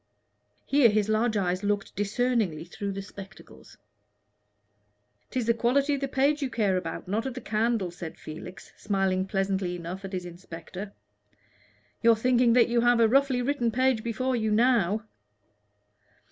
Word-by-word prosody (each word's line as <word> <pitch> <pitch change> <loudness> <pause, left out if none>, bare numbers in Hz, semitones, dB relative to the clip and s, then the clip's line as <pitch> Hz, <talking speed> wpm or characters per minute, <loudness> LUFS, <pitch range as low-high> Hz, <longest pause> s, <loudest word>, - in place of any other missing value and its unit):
Here 275 -4 +5
his 215 0 +1
large 215 +1 +1
eyes 185 0 -1
looked 205 -1 -1
discerningly 205 -6 0
through 200 +3 -5
the 195 0 -5
spectacles. 195 -1 -13 1.5
"'Tis 255 -3 -2
the 230 - +3
quality 275 +5 +1
of 280 - -2
the 275 - -1
page 280 +3 +1
you 275 - -1
care 205 -6 +1
about, 180 -2 -4
not 220 +6 -1
of 260 - -5
the - - -4
candle," 220 -5 0
said 170 -2 -8
Felix, 160 +4 -10
smiling 195 -2 0
pleasantly 195 -2 -1
enough 175 +3 -7
at 195 0 -7
his 180 -1 -3
inspector. 175 +3 -9 1.1
"You're 230 0 +6
thinking 240 +1 +3
that 245 -1 +5
you 235 0 +2
have 240 0 +4
a 230 - +6
roughly 265 0 +2
written 250 -3 0
page 255 -1 +1
before 255 +3 -1
you 220 -2 0
now." 220 -2 +2
215 Hz, 155 wpm, -27 LUFS, 190-245 Hz, 1.5 s, You're